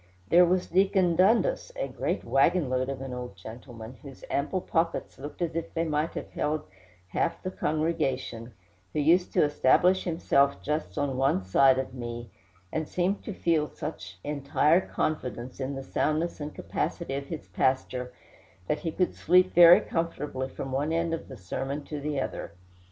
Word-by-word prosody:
There 175 Hz, +1 st, +7 dB
was 180 Hz, +1 st, +1 dB
Deacon 185 Hz, -1 st, +3 dB
Dundas, 230 Hz, -, +3 dB
a -, -, -2 dB
great -, -, -2 dB
wagon 145 Hz, +1 st, +2 dB
load 130 Hz, +1 st, 0 dB
of 135 Hz, -1 st, -4 dB
an 135 Hz, -1 st, -5 dB
old 125 Hz, -4 st, -6 dB
gentleman, 115 Hz, +3 st, -10 dB
whose 135 Hz, -3 st, -12 dB
ample 150 Hz, +7 st, 0 dB
pockets 165 Hz, -6 st, -1 dB
looked 145 Hz, +5 st, -5 dB
as 165 Hz, -, -3 dB
if 165 Hz, +1 st, -4 dB
they 165 Hz, -, +1 dB
might 155 Hz, 0 st, -1 dB
have -, -, -6 dB
held 150 Hz, +1 st, -1 dB, 0.5 s
half 165 Hz, -, -1 dB
the 185 Hz, -, -3 dB
congregation, 140 Hz, -9 st, -1 dB, 0.4 s
who 155 Hz, -, 0 dB
used 170 Hz, +5 st, +3 dB
to -, -, +4 dB
establish 165 Hz, +6 st, +3 dB
himself 140 Hz, -5 st, +2 dB
just 150 Hz, +1 st, -2 dB
on 140 Hz, -3 st, -1 dB
one 135 Hz, -8 st, +2 dB
side 130 Hz, +8 st, +5 dB
of 130 Hz, -1 st, -3 dB
me, 120 Hz, -1 st, -6 dB, 0.4 s
and 160 Hz, -1 st, -1 dB
seemed 185 Hz, +3 st, -1 dB
to -, -, -4 dB
feel 160 Hz, -4 st, +1 dB
such 95 Hz, -, -7 dB
entire 145 Hz, +3 st, +2 dB
confidence 130 Hz, -8 st, -3 dB
in 135 Hz, +1 st, -3 dB
the 135 Hz, -, -5 dB
soundness 155 Hz, +5 st, -1 dB
and 150 Hz, +1 st, -5 dB
capacity 170 Hz, -6 st, -3 dB
of 140 Hz, 0 st, -4 dB
his 160 Hz, 0 st, -6 dB
pastor 130 Hz, -1 st, 0 dB, 0.6 s
that 150 Hz, -, 0 dB
he 165 Hz, -, -3 dB
could 180 Hz, +2 st, 0 dB
sleep 185 Hz, +1 st, +3 dB
very 175 Hz, 0 st, +9 dB
comfortably 150 Hz, -5 st, -3 dB
from 135 Hz, 0 st, -6 dB
one 145 Hz, +4 st, 0 dB
end 165 Hz, 0 st, 0 dB
of 165 Hz, -, -4 dB
the 130 Hz, -, -9 dB
sermon 135 Hz, +10 st, -4 dB
to 150 Hz, 0 st, -6 dB
the 145 Hz, -1 st, -2 dB
other. -, -, -4 dB
150 Hz, 175 wpm, -28 LUFS, 130-170 Hz, 0.6 s, very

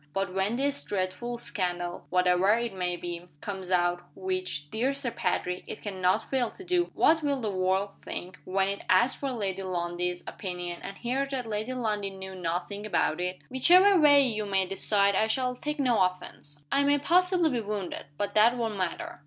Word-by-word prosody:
But 195 Hz, -1 st, -1 dB
when 195 Hz, +4 st, 0 dB
this 280 Hz, +2 st, -1 dB
dreadful 205 Hz, +5 st, -3 dB
scandal 175 Hz, -6 st, -3 dB
(whatever 180 Hz, +2 st, +4 dB
it 235 Hz, -2 st, -2 dB
may 180 Hz, -2 st, -1 dB
be) 175 Hz, 0 st, -6 dB
comes 190 Hz, -1 st, -6 dB
out 175 Hz, -1 st, +2 dB
which, 185 Hz, -6 st, -3 dB
dear 255 Hz, +5 st, 0 dB
Sir 275 Hz, -4 st, -3 dB
Patrick, 180 Hz, -3 st, -1 dB
it -, -, -8 dB
can 195 Hz, -3 st, -5 dB
not 185 Hz, +4 st, +3 dB
fail 255 Hz, -4 st, 0 dB
to 380 Hz, -, -12 dB
do 355 Hz, -1 st, +1 dB
what 320 Hz, +1 st, +4 dB
will 285 Hz, -2 st, 0 dB
the 220 Hz, -4 st, -2 dB
world 190 Hz, +1 st, 0 dB
think, 180 Hz, +1 st, -7 dB
when 190 Hz, +1 st, +1 dB
it 200 Hz, 0 st, -3 dB
asks 235 Hz, +8 st, +4 dB
for 275 Hz, -1 st, -2 dB
Lady 195 Hz, -5 st, -2 dB
Lundie's, 175 Hz, -1 st, -2 dB
opinion, 180 Hz, -2 st, -5 dB
and 195 Hz, -, -7 dB
hears 265 Hz, +3 st, -1 dB
that 260 Hz, -3 st, -3 dB
Lady 220 Hz, +3 st, -3 dB
Lundie 215 Hz, -5 st, -1 dB
knew 190 Hz, 0 st, -8 dB
nothing 180 Hz, +3 st, -3 dB
about 180 Hz, -5 st, 0 dB
it? 180 Hz, 0 st, -3 dB
Whichever 360 Hz, +9 st, +6 dB
way 285 Hz, -2 st, +7 dB
you 215 Hz, -4 st, -2 dB
may 195 Hz, -1 st, +1 dB
decide 200 Hz, +1 st, +2 dB
I 215 Hz, +3 st, +2 dB
shall 250 Hz, +3 st, 0 dB
take 300 Hz, +4 st, -4 dB
no 250 Hz, -7 st, +2 dB
offense. 145 Hz, -5 st, -3 dB
I 280 Hz, -, +3 dB
may 285 Hz, +1 st, +4 dB
possibly 355 Hz, +2 st, +3 dB
be 240 Hz, -3 st, 0 dB
wounded 205 Hz, -8 st, -4 dB
but 200 Hz, 0 st, -2 dB
that 230 Hz, +3 st, +5 dB
won't 225 Hz, -3 st, -2 dB
matter. 180 Hz, -5 st, -3 dB
200 Hz, 190 wpm, -28 LUFS, 185-250 Hz, -, way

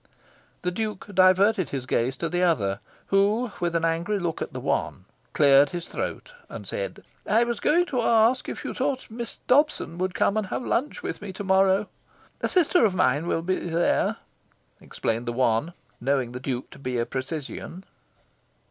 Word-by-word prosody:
The 180 Hz, -, 0 dB
Duke 210 Hz, +1 st, -4 dB
diverted 185 Hz, +1 st, +4 dB
his 135 Hz, -2 st, -4 dB
gaze 130 Hz, 0 st, 0 dB
to 165 Hz, -, -2 dB
the 175 Hz, +1 st, -1 dB
other, 105 Hz, -, +1 dB, 0.3 s
who, 210 Hz, +4 st, +3 dB
with 175 Hz, -1 st, -1 dB
an 165 Hz, 0 st, +2 dB
angry 170 Hz, +5 st, 0 dB
look 175 Hz, -4 st, -3 dB
at -, -, -3 dB
the -, -, -6 dB
one, 90 Hz, -, -2 dB, 0.3 s
cleared 140 Hz, -1 st, +6 dB
his 175 Hz, +3 st, -5 dB
throat, -, -, -5 dB, 0.2 s
and -, -, -8 dB
said -, -, -5 dB, 0.2 s
"I 225 Hz, +3 st, +4 dB
was 235 Hz, -2 st, -2 dB
going 350 Hz, +3 st, +3 dB
to 255 Hz, -8 st, -1 dB
ask 230 Hz, +2 st, +3 dB
if -, -, -6 dB
you -, -, -3 dB
thought 260 Hz, -3 st, -2 dB
Miss 235 Hz, +1 st, -6 dB
Dobson 270 Hz, -, +2 dB
would 185 Hz, 0 st, -1 dB
come 200 Hz, -, +2 dB
and 215 Hz, -3 st, -1 dB
have 245 Hz, -, -4 dB
luncheon 280 Hz, +5 st, -1 dB
with -, -, -4 dB
me 205 Hz, -1 st, -6 dB
to 195 Hz, -, -6 dB
morrow?" 190 Hz, +1 st, +3 dB, 0.5 s
"A -, -, 0 dB
sister 355 Hz, -4 st, +3 dB
of 200 Hz, -4 st, +3 dB
mine 150 Hz, -2 st, +2 dB
will 165 Hz, -, 0 dB
be 185 Hz, +2 st, 0 dB
there," 170 Hz, 0 st, +1 dB, 0.6 s
explained 115 Hz, +1 st, -3 dB
the 120 Hz, -, -1 dB
one, 120 Hz, +5 st, +1 dB, 0.3 s
knowing 130 Hz, -1 st, 0 dB
the 125 Hz, -, -6 dB
Duke 130 Hz, -1 st, -4 dB
to -, -, -13 dB
be 130 Hz, -2 st, -3 dB
a 115 Hz, -, 0 dB
precisian. 150 Hz, +7 st, -5 dB
180 Hz, 185 wpm, -25 LUFS, 140-220 Hz, 0.6 s, cleared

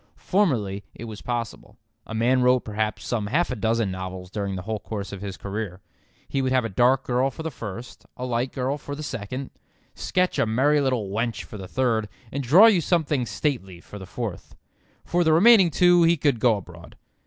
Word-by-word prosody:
Formerly 115 Hz, -, 0 dB
it -, -, -9 dB
was 110 Hz, -2 st, -8 dB
possible. 120 Hz, -3 st, -5 dB, 0.3 s
A 115 Hz, -, -6 dB
man 125 Hz, +3 st, +2 dB
wrote 125 Hz, 0 st, +4 dB
perhaps 110 Hz, 0 st, -3 dB
some 110 Hz, -4 st, -2 dB
half 155 Hz, +9 st, +1 dB
a -, -, -2 dB
dozen 110 Hz, -2 st, 0 dB
novels 95 Hz, 0 st, -6 dB
during 100 Hz, -2 st, -3 dB
the 90 Hz, -, -5 dB
whole 110 Hz, +2 st, -3 dB
course 100 Hz, -2 st, -6 dB
of 100 Hz, -1 st, -7 dB
his 100 Hz, -2 st, -6 dB
career. 100 Hz, -2 st, -5 dB, 0.5 s
He 135 Hz, -, -1 dB
could 130 Hz, -1 st, 0 dB
have 130 Hz, -2 st, +2 dB
a -, -, -2 dB
dark 125 Hz, +6 st, +3 dB
girl 125 Hz, +2 st, +1 dB
for 150 Hz, +5 st, -8 dB
the 160 Hz, -, -3 dB
first, 115 Hz, 0 st, -8 dB
a 125 Hz, -, -4 dB
light 125 Hz, +1 st, -1 dB
girl 135 Hz, +2 st, -2 dB
for 145 Hz, +1 st, -6 dB
the 155 Hz, -, -7 dB
second, 130 Hz, 0 st, -5 dB, 0.4 s
sketch 185 Hz, 0 st, 0 dB
a -, -, +2 dB
merry 140 Hz, +7 st, +3 dB
little 125 Hz, -7 st, 0 dB
wench 115 Hz, +2 st, -2 dB
for 110 Hz, -, -10 dB
the 95 Hz, -, -7 dB
third, 115 Hz, -3 st, 0 dB, 0.2 s
and 140 Hz, -, -2 dB
draw 155 Hz, -, +7 dB
you 210 Hz, -6 st, +5 dB
something 150 Hz, -6 st, 0 dB
stately 95 Hz, -, -3 dB
for 105 Hz, +4 st, -11 dB
the 95 Hz, -, -9 dB
fourth. 110 Hz, -3 st, -6 dB, 0.5 s
For 175 Hz, 0 st, +1 dB
the 160 Hz, -1 st, +3 dB
remaining 195 Hz, +1 st, +7 dB
two 175 Hz, +2 st, +4 dB
he 170 Hz, 0 st, +4 dB
could 140 Hz, -5 st, +1 dB
go 115 Hz, -2 st, +3 dB
abroad. 90 Hz, -3 st, -12 dB
120 Hz, 205 wpm, -24 LUFS, 105-140 Hz, 0.5 s, draw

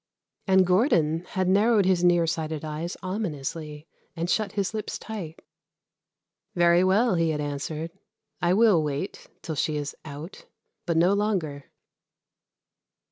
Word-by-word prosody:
And 190 Hz, -1 st, +5 dB
Gordon 175 Hz, -, +2 dB
had 185 Hz, -1 st, -2 dB
narrowed 205 Hz, +2 st, +4 dB
his 185 Hz, -2 st, +2 dB
near 175 Hz, -1 st, +4 dB
sighted 160 Hz, -2 st, -3 dB
eyes 155 Hz, +3 st, -4 dB
ominously 155 Hz, -5 st, -4 dB, 0.3 s
and 170 Hz, +1 st, -2 dB
shut 215 Hz, -3 st, 0 dB
his 200 Hz, 0 st, -1 dB
lips 215 Hz, -1 st, -4 dB
tight. 185 Hz, -8 st, -8 dB, 1.1 s
"Very 175 Hz, 0 st, +4 dB
well," 200 Hz, +5 st, +3 dB
he 165 Hz, -2 st, +2 dB
had 155 Hz, -1 st, -1 dB
answered, 150 Hz, +3 st, -4 dB, 0.5 s
"I 175 Hz, +1 st, +3 dB
will 210 Hz, -6 st, +5 dB
wait 150 Hz, +5 st, -4 dB, 0.2 s
till 160 Hz, -, -4 dB
she 155 Hz, +1 st, -1 dB
is 145 Hz, -1 st, -4 dB
out 150 Hz, +4 st, -9 dB, 0.4 s
but 170 Hz, -1 st, +1 dB
no 175 Hz, +4 st, +4 dB
longer." 185 Hz, -9 st, -1 dB
170 Hz, 135 wpm, -26 LUFS, 155-190 Hz, 1.1 s, And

